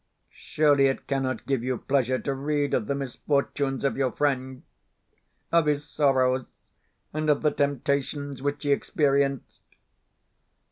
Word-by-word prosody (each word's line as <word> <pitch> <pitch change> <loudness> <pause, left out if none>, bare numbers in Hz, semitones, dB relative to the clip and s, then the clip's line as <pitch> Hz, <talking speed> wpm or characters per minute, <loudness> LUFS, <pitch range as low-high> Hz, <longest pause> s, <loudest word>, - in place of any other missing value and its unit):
Surely 145 -3 +2
it 135 - -2
cannot 135 -1 -2
give 135 -4 -1
you 130 0 -1
pleasure 130 -1 +1
to 140 - -3
read 145 +1 -1
of 105 - 0
the 140 - 0
misfortunes 140 0 -1
of 135 - +1
your 130 -2 0
friend 130 -3 -1 0.9
of 165 -2 +3
his 145 -1 0
sorrows, 130 -3 +2 0.7
and 155 0 -1
of 150 - +2
the 150 - +3
temptations 140 0 -1
which 145 +2 -2
he 145 - +1
experienced?... 140 -2 0
140 Hz, 135 wpm, -26 LUFS, 130-145 Hz, 0.9 s, of